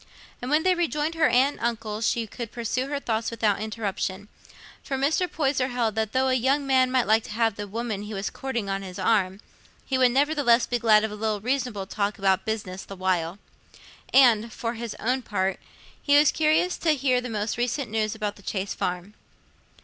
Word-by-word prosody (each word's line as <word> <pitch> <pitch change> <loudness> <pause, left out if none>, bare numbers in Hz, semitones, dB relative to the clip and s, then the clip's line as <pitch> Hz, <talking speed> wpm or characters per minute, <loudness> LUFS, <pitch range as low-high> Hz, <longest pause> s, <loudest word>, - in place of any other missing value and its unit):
And 250 - -4
when 305 +2 +3
they 370 - +4
rejoined 325 -3 -1
her 325 -2 +3
aunt 260 +4 +3
and - - -10
uncle, 225 -2 -2
she 230 +1 +1
could 230 +1 -7
pursue 245 +2 -2
her 285 0 -2
thoughts 225 -4 -1
without 215 -3 0
interruption, 210 -2 -4 0.5
for 270 - -3
Mr. 315 +7 +1
Poyser 270 -4 0
held 240 -3 0
that 220 0 -1
though 260 +2 +2
a - - +2
young 265 +3 +1
man 260 -1 +3
might 255 -1 +2
like 220 +1 +3
to - - -10
have 225 0 +2
the 205 0 -6
woman 220 0 -3
he 210 +1 -7
was 195 +1 -3
courting 240 -6 -4
on 195 0 -2
his 185 -2 -8
arm, 195 -3 +1 0.4
he 260 -1 -1
would 255 -1 +6
nevertheless 270 -3 +3
be 245 - -1
glad 215 -2 +5
of 220 - -2
a - - -6
little 215 -1 -1
reasonable 245 -3 -2
talk 200 +1 -2
about 190 -1 +1
business 205 -4 -4
the 195 - -9
while; 185 -2 -1 0.7
and, 235 -4 +5
for 230 +1 -3
his 230 -1 -6
own 255 +3 0
part, 195 -4 -1 0.4
he 285 0 +4
was 295 0 +5
curious 315 +3 +1
to 315 -2 +2
hear 255 -2 +1
the 250 - -6
most 215 0 -2
recent 245 0 -2
news 220 -1 -1
about 210 -2 -3
the - - -15
Chase 195 0 -3
Farm. 180 +3 -3
230 Hz, 205 wpm, -25 LUFS, 210-265 Hz, 0.7 s, would